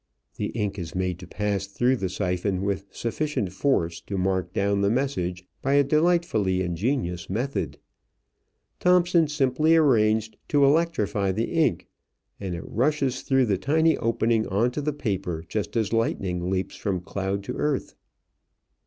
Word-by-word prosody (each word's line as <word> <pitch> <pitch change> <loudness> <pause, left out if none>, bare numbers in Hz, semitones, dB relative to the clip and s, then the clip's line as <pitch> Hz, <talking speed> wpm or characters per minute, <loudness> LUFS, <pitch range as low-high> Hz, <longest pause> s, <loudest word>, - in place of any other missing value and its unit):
The - - -1
ink 105 -2 -2
is 85 -1 -6
made 90 -1 -1
to 90 - -10
pass 100 0 -2
through 125 +6 +1
the 95 -4 -2
siphon 95 0 -1
with 100 0 -2
sufficient 120 -5 -2
force 85 -8 0
to 100 - -3
mark 95 -1 0
down 100 +1 +1
the 100 - +3
message 90 -8 -1 0.2
by 135 - +1
a 140 0 +5
delightfully 150 - +2
ingenious 90 - -2
method. 110 - -2 1.0
Thomson 175 -2 +4
simply 150 +2 +2
arranged 110 -7 +3
to 145 -1 +4
electrify 135 - +2
the 110 +4 -2
ink, 165 -2 +1 0.5
and 95 -3 -4
it 85 - -7
rushes 135 +1 0
through 135 -1 +2
the 100 -5 0
tiny 160 +5 +3
opening 115 -1 +1
on 110 +6 +1
to 150 - -3
the 150 +1 0
paper 95 - -3
just 105 +4 -3
as 110 -1 0
lightning 90 -6 0
leaps 95 -1 -2
from 95 -4 -2
cloud 100 +1 -3
to - - -4
earth. 150 -3 -1
105 Hz, 155 wpm, -25 LUFS, 95-140 Hz, 1.0 s, a